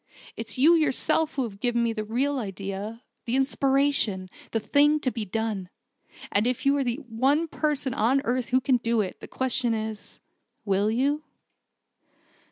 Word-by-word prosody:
It's 225 Hz, -1 st, -2 dB
you 300 Hz, +7 st, +6 dB
yourself 315 Hz, 0 st, +1 dB
who 270 Hz, -, 0 dB
has 230 Hz, -4 st, -5 dB
given 235 Hz, +2 st, +1 dB
me 230 Hz, -1 st, +1 dB
the 215 Hz, -1 st, -3 dB
real 260 Hz, +6 st, 0 dB
idea 200 Hz, +2 st, -5 dB, 0.2 s
the 240 Hz, +1 st, -1 dB
inspiration: 265 Hz, -7 st, +1 dB, 0.2 s
the 225 Hz, -, 0 dB
thing 295 Hz, +6 st, +3 dB
to 255 Hz, -, 0 dB
be 225 Hz, -3 st, -4 dB
done. 210 Hz, -2 st, -3 dB, 0.6 s
And 210 Hz, +3 st, +2 dB
if 250 Hz, +1 st, -2 dB
you 275 Hz, +1 st, +4 dB
are 275 Hz, -, +1 dB
the 240 Hz, -2 st, -1 dB
one 270 Hz, +8 st, +1 dB
person 295 Hz, -4 st, -1 dB
on 245 Hz, +6 st, +2 dB
earth 245 Hz, +1 st, -1 dB
who 255 Hz, +1 st, +3 dB
can 255 Hz, -1 st, +3 dB
do 230 Hz, -1 st, +1 dB
it, 190 Hz, -, -5 dB
the -, -, -9 dB
question 255 Hz, -2 st, 0 dB
is 220 Hz, -1 st, -6 dB, 0.5 s
will 200 Hz, +1 st, +2 dB
you?" 275 Hz, +6 st, +1 dB
240 Hz, 170 wpm, -26 LUFS, 220-275 Hz, 0.6 s, you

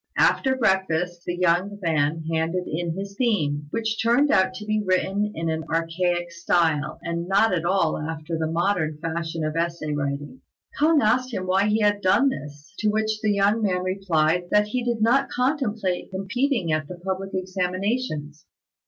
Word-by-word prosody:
After 265 Hz, -1 st, +3 dB
breakfast, 180 Hz, -6 st, 0 dB
the 175 Hz, -, -2 dB
young 185 Hz, +3 st, +1 dB
man 160 Hz, -2 st, 0 dB
handed 165 Hz, +3 st, 0 dB
in 165 Hz, +1 st, -3 dB
his 200 Hz, 0 st, -6 dB
theme, 150 Hz, -, 0 dB
which 220 Hz, +4 st, -2 dB
turned 245 Hz, +6 st, +3 dB
out 190 Hz, 0 st, +4 dB
to 210 Hz, -, -7 dB
be 215 Hz, 0 st, 0 dB
written 195 Hz, +2 st, 0 dB
in 165 Hz, +1 st, -3 dB
an 160 Hz, 0 st, -1 dB
archaic 175 Hz, +1 st, 0 dB
style, 160 Hz, -3 st, +1 dB
and 170 Hz, +1 st, -3 dB
not 200 Hz, +2 st, +3 dB
at 170 Hz, -2 st, -1 dB
all 175 Hz, -3 st, +1 dB
after 160 Hz, +1 st, -4 dB
the 160 Hz, -1 st, -1 dB
modern 165 Hz, -2 st, 0 dB
fashion 165 Hz, 0 st, -3 dB
of 155 Hz, 0 st, -3 dB
essay 165 Hz, -2 st, -2 dB
writing. 145 Hz, -, -4 dB, 0.4 s
K'ung 305 Hz, 0 st, +4 dB
asked 255 Hz, +4 st, +2 dB
him 185 Hz, -5 st, -3 dB
why 190 Hz, +2 st, +2 dB
he 215 Hz, +1 st, +2 dB
had 205 Hz, -1 st, +2 dB
done 200 Hz, +9 st, +4 dB
this, 145 Hz, -, -8 dB
to 215 Hz, -, +2 dB
which 215 Hz, 0 st, 0 dB
the 215 Hz, -, +1 dB
young 205 Hz, +2 st, +2 dB
man 185 Hz, -3 st, 0 dB
replied 180 Hz, -3 st, +1 dB
that 210 Hz, 0 st, +3 dB
he 250 Hz, +2 st, -1 dB
did 235 Hz, -2 st, 0 dB
not 265 Hz, +5 st, +3 dB
contemplate 240 Hz, -, -1 dB
competing 195 Hz, -, -1 dB
at 155 Hz, -1 st, 0 dB
the 180 Hz, -, -7 dB
public 190 Hz, +2 st, -4 dB
examinations. 185 Hz, -, -2 dB
185 Hz, 170 wpm, -24 LUFS, 165-210 Hz, 0.4 s, out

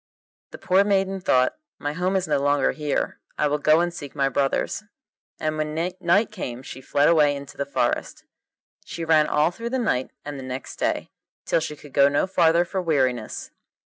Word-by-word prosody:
The -, -, -10 dB
poor 190 Hz, +2 st, +3 dB
maiden 195 Hz, -1 st, +1 dB
thought, 130 Hz, -, +2 dB, 0.2 s
'My 145 Hz, 0 st, -3 dB
home 180 Hz, +4 st, 0 dB
is 185 Hz, -2 st, 0 dB
no 145 Hz, -2 st, +2 dB
longer 145 Hz, +1 st, +2 dB
here; 150 Hz, -2 st, -2 dB, 0.2 s
I -, -, +2 dB
will 150 Hz, +1 st, 0 dB
go 155 Hz, +3 st, +4 dB
and 175 Hz, 0 st, -1 dB
seek 145 Hz, -4 st, -8 dB
my 135 Hz, -1 st, +2 dB
brothers.' 135 Hz, +7 st, 0 dB, 0.6 s
And 155 Hz, 0 st, -2 dB
when 155 Hz, 0 st, -2 dB
night 180 Hz, +5 st, +1 dB
came 130 Hz, -, -6 dB
she 130 Hz, -, -9 dB
fled 145 Hz, +2 st, +2 dB
away 150 Hz, -3 st, +4 dB
into 140 Hz, 0 st, -9 dB
the 140 Hz, -, -3 dB
forest. 140 Hz, -, -1 dB, 0.6 s
She 165 Hz, -, -6 dB
ran 155 Hz, -2 st, +4 dB
all 150 Hz, +3 st, +2 dB
through 230 Hz, +6 st, -5 dB
the 260 Hz, -, -1 dB
night 130 Hz, -, 0 dB, 0.2 s
and 145 Hz, -1 st, -6 dB
the -, -, -7 dB
next 130 Hz, 0 st, -6 dB
day, -, -, -1 dB, 0.3 s
till -, -, +2 dB
she 155 Hz, -1 st, -4 dB
could 145 Hz, -1 st, -15 dB
go 140 Hz, 0 st, +5 dB
no 145 Hz, +4 st, +1 dB
farther 170 Hz, -2 st, +3 dB
for 190 Hz, +2 st, -3 dB
weariness. 130 Hz, -9 st, -1 dB
155 Hz, 195 wpm, -24 LUFS, 140-175 Hz, 0.6 s, go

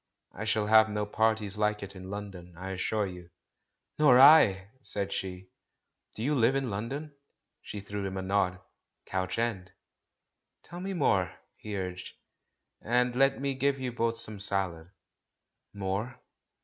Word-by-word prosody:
"I 105 Hz, -, -6 dB
shall 110 Hz, -1 st, +1 dB
have 110 Hz, +1 st, +6 dB
no 105 Hz, 0 st, -1 dB
parties 105 Hz, -1 st, 0 dB
like 105 Hz, -1 st, +1 dB
it 100 Hz, 0 st, -8 dB
in 95 Hz, 0 st, -9 dB
London, 95 Hz, -4 st, -8 dB
I 95 Hz, +2 st, -6 dB
assure 105 Hz, +3 st, -1 dB
you." 90 Hz, -2 st, -9 dB, 0.7 s
"Nor 135 Hz, -5 st, +7 dB
I 105 Hz, -10 st, +7 dB
!" 130 Hz, -, -34 dB
said 100 Hz, -5 st, -3 dB
she. 95 Hz, 0 st, -5 dB, 0.6 s
"Do 110 Hz, -, -5 dB
you 145 Hz, +4 st, +1 dB
live 125 Hz, -1 st, +3 dB
in 135 Hz, -4 st, -1 dB
London?" 135 Hz, +9 st, -4 dB, 0.5 s
She 105 Hz, -, -7 dB
threw 100 Hz, 0 st, -5 dB
him 95 Hz, 0 st, -5 dB
a 95 Hz, -, -3 dB
nod. 95 Hz, -1 st, 0 dB, 0.5 s
"Crouch 95 Hz, +1 st, -2 dB
End." 110 Hz, -6 st, -2 dB, 0.9 s
"Tell 175 Hz, -, -9 dB
me 190 Hz, +1 st, -4 dB
more," 95 Hz, -, +2 dB, 0.2 s
he 105 Hz, -2 st, -6 dB
urged. 90 Hz, -1 st, -5 dB, 0.7 s
"And 125 Hz, +1 st, +1 dB
let 135 Hz, +1 st, +3 dB
me 140 Hz, 0 st, -1 dB
give 135 Hz, +1 st, +1 dB
you 130 Hz, -1 st, -3 dB
both 115 Hz, -1 st, -1 dB
some 110 Hz, -2 st, -3 dB
salad." 95 Hz, -4 st, -2 dB, 0.8 s
"More? 100 Hz, +5 st, -3 dB
105 Hz, 155 wpm, -29 LUFS, 95-125 Hz, 0.9 s, Nor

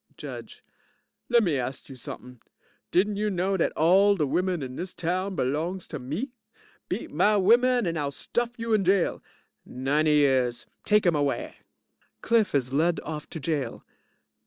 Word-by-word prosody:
JUDGE -, -, -9 dB, 0.7 s
Lemme 205 Hz, -, +3 dB
ast 130 Hz, +2 st, -5 dB
you 135 Hz, -, -10 dB
something. 125 Hz, 0 st, -9 dB, 0.5 s
Didn't 200 Hz, +3 st, +2 dB
you 210 Hz, +1 st, 0 dB
know 190 Hz, 0 st, 0 dB
dat 175 Hz, -, +1 dB
all 195 Hz, +5 st, +5 dB
de 155 Hz, -6 st, +1 dB
women 180 Hz, +2 st, 0 dB
in 130 Hz, -1 st, -6 dB
dis 180 Hz, +4 st, -6 dB
town 185 Hz, +3 st, -2 dB
belongs 165 Hz, +8 st, -2 dB
to 150 Hz, -, -5 dB
me? 155 Hz, -, -4 dB, 0.6 s
Beat -, -, -4 dB
my 210 Hz, 0 st, +3 dB
women 240 Hz, +5 st, +4 dB
and 165 Hz, -2 st, -1 dB
I'll 145 Hz, -1 st, -1 dB
stuff 240 Hz, -, -3 dB
you 230 Hz, -1 st, -2 dB
in 210 Hz, -2 st, +3 dB
jail. 190 Hz, 0 st, +2 dB, 0.4 s
90 145 Hz, +5 st, 0 dB
years. 130 Hz, -5 st, +2 dB, 0.2 s
Take 210 Hz, -1 st, +3 dB
'im 175 Hz, -, +4 dB
away. 145 Hz, -2 st, -1 dB, 0.7 s
(CLIFF 225 Hz, -7 st, +2 dB
is 130 Hz, -1 st, 0 dB
led 165 Hz, +4 st, +2 dB
off 150 Hz, -1 st, -6 dB
to 160 Hz, -, -6 dB
jail. 150 Hz, -2 st, -3 dB
170 Hz, 160 wpm, -26 LUFS, 140-200 Hz, 0.7 s, all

